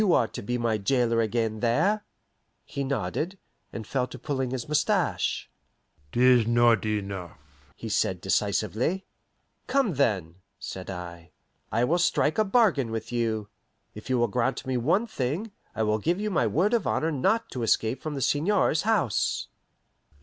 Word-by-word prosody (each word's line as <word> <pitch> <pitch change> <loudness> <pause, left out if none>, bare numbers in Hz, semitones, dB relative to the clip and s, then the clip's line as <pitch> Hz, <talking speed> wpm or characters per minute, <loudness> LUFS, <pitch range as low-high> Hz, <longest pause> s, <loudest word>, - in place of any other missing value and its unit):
You 200 -5 +4
are 115 - +3
to - - -7
be 120 +5 -2
my 115 -2 0
jailer 115 +1 +2
again 110 -1 -1
there?" 160 - +2 0.6
He 140 -2 -4
nodded, 140 - -2 0.3
and 110 - -6
fell 125 +2 -1
to 130 - -9
pulling 130 -1 -2
his 125 -2 -4
mustache. 150 0 0 0.6
"'Tis 125 -2 +5
not 120 -2 +4
enough," 100 -6 -3 0.4
he 115 - -7
said 95 -3 0
decisively. 105 - 0 0.6
"Come, 270 -9 +2
then," 95 - 0 0.2
said 95 0 -7
I, 85 -2 -8 0.4
"I 115 +2 +2
will 170 +8 +2
strike 165 0 +2
a - - +5
bargain 195 - +3
with 115 +1 -5
you. 110 -3 -1 0.4
If 105 +4 -10
you 130 - +2
will 120 0 +3
grant 125 +5 -1
me 130 0 -1
one 165 - +2
thing, 185 - -3 0.2
I 110 - 0
will 105 0 +1
give 170 - 0
my 155 -10 +2
word 180 - +1
of 235 -4 +1
honour 160 +1 +1
not 195 - +1
to 125 - -4
escape 115 +2 +1
from 155 -2 -4
the 135 - -2
seigneur's 160 - +2
house." 210 - 0
125 Hz, 160 wpm, -27 LUFS, 110-155 Hz, 0.6 s, Tis